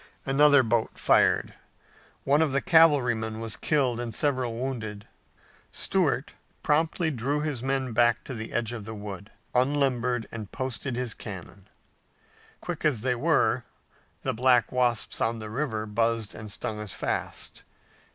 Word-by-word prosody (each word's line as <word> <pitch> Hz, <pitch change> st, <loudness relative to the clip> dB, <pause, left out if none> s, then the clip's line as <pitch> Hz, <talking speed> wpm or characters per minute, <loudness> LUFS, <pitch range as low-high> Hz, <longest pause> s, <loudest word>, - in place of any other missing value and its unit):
Another 145 Hz, 0 st, +5 dB
boat 115 Hz, -1 st, 0 dB
fired. -, -, +3 dB, 0.7 s
One 145 Hz, +3 st, +3 dB
of 155 Hz, -4 st, +1 dB
the 140 Hz, -, +3 dB
cavalrymen 125 Hz, -11 st, +3 dB
was 115 Hz, -1 st, -3 dB
killed 130 Hz, -6 st, +1 dB
and 120 Hz, -3 st, -4 dB
several 130 Hz, -5 st, 0 dB
wounded. 110 Hz, -5 st, -4 dB, 0.7 s
Stuart -, -, +1 dB, 0.3 s
promptly 160 Hz, +2 st, +1 dB
drew 140 Hz, +3 st, -1 dB
his 150 Hz, -6 st, -2 dB
men 135 Hz, -2 st, -1 dB
back 120 Hz, 0 st, +3 dB
to 130 Hz, -, -7 dB
the 110 Hz, -2 st, -6 dB
edge 120 Hz, 0 st, -1 dB
of 110 Hz, -4 st, -6 dB
the 110 Hz, +1 st, -6 dB
wood, 100 Hz, -1 st, -7 dB, 0.2 s
unlimbered 125 Hz, -3 st, +1 dB
and 110 Hz, -4 st, -7 dB
posted 130 Hz, 0 st, -4 dB
his 125 Hz, -3 st, -2 dB
cannon. 95 Hz, -1 st, -9 dB, 0.9 s
Quick 175 Hz, -3 st, -5 dB
as 145 Hz, -8 st, +2 dB
they 125 Hz, +1 st, +1 dB
were, 120 Hz, -, +2 dB, 0.6 s
the -, -, 0 dB
black 125 Hz, -1 st, +3 dB
wasps 125 Hz, -2 st, 0 dB
on 115 Hz, +1 st, +1 dB
the 110 Hz, -1 st, -7 dB
river 110 Hz, -4 st, -2 dB
buzzed 115 Hz, 0 st, 0 dB
and 110 Hz, -1 st, -8 dB
stung 105 Hz, +1 st, -4 dB
as 105 Hz, -3 st, -5 dB
fast. -, -, -4 dB
120 Hz, 145 wpm, -27 LUFS, 110-135 Hz, 0.9 s, Another